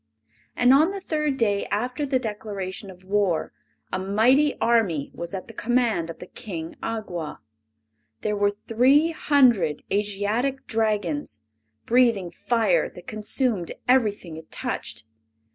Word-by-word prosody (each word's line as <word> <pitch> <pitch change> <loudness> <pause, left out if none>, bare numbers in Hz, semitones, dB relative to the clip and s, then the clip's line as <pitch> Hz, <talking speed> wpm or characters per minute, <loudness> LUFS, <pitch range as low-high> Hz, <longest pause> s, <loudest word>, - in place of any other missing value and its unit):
And 245 +1 +5
on 305 +5 +5
the 395 0 -4
third 300 -6 -1
day 205 -4 +1
after 250 +7 -2
the 265 -1 +2
declaration 205 -4 -5
of 185 0 -13
war 195 -3 0 0.4
a - - 0
mighty 235 +10 +3
army 200 -12 +2
was 170 0 -6
at 185 - -6
the 230 - -11
command 230 -7 +1
of 165 - -7
the - - -9
King 170 -6 -7
Awgwa. 185 -8 -4 0.8
There 210 -1 -1
were 205 0 +3
three 255 +10 +3
hundred 240 - +3
Asiatic 210 +6 -1
Dragons, 200 - -1 0.4
breathing 230 -7 +3
fire 240 - +1
that - - -13
consumed 215 -3 -1
everything 210 -10 +1
it 160 - -12
touched. - - -4
215 Hz, 130 wpm, -25 LUFS, 185-250 Hz, 0.8 s, And